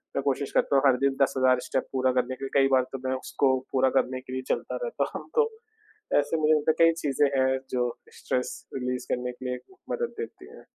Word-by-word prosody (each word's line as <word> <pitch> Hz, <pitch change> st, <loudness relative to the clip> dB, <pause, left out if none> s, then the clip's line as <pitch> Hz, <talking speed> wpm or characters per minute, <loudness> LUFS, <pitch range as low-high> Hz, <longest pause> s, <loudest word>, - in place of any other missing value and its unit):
मैं 140 Hz, -, +1 dB
कोशिश 140 Hz, 0 st, -1 dB
करता -, -, +2 dB
हूँ 135 Hz, -, +4 dB
हर 125 Hz, -1 st, +4 dB
दिन 135 Hz, -1 st, +2 dB
10,000 130 Hz, -2 st, +3 dB
स्टेप -, -, -1 dB
पूरा 130 Hz, -1 st, +2 dB
करने 125 Hz, 0 st, 0 dB
के 135 Hz, -, -6 dB
लिए। 135 Hz, -, -5 dB
कई 135 Hz, -, +5 dB
बार 130 Hz, -1 st, +5 dB
तो 135 Hz, -, -4 dB
मैं 130 Hz, -, 0 dB
उसको 130 Hz, 0 st, +1 dB
पूरा 130 Hz, 0 st, +3 dB
करने 130 Hz, 0 st, -2 dB
के 130 Hz, 0 st, -9 dB
लिए 130 Hz, -, -2 dB
चलता -, -, -1 dB
रहता 485 Hz, -, -1 dB
हूँ -, -, -6 dB
तो 455 Hz, -1 st, +4 dB, 0.7 s
ऐसे 145 Hz, +3 st, 0 dB
मुझे 155 Hz, 0 st, +4 dB
लगता 155 Hz, 0 st, +3 dB
है 165 Hz, +1 st, +4 dB
कई 165 Hz, -, +4 dB
चीज़ें 145 Hz, 0 st, +2 dB
हैं 130 Hz, 0 st, +3 dB
जो 125 Hz, -1 st, +1 dB, 0.3 s
स्ट्रेस 125 Hz, 0 st, -2 dB, 0.2 s
रिलीज़ 125 Hz, -1 st, -2 dB
करने 125 Hz, 0 st, -2 dB
के 125 Hz, +1 st, -11 dB
लिए 125 Hz, -, -2 dB, 0.3 s
मदद 475 Hz, 0 st, -2 dB
देती 450 Hz, -, -7 dB
हैं। -, -, -14 dB
130 Hz, 230 wpm, -27 LUFS, 130-145 Hz, 0.7 s, कई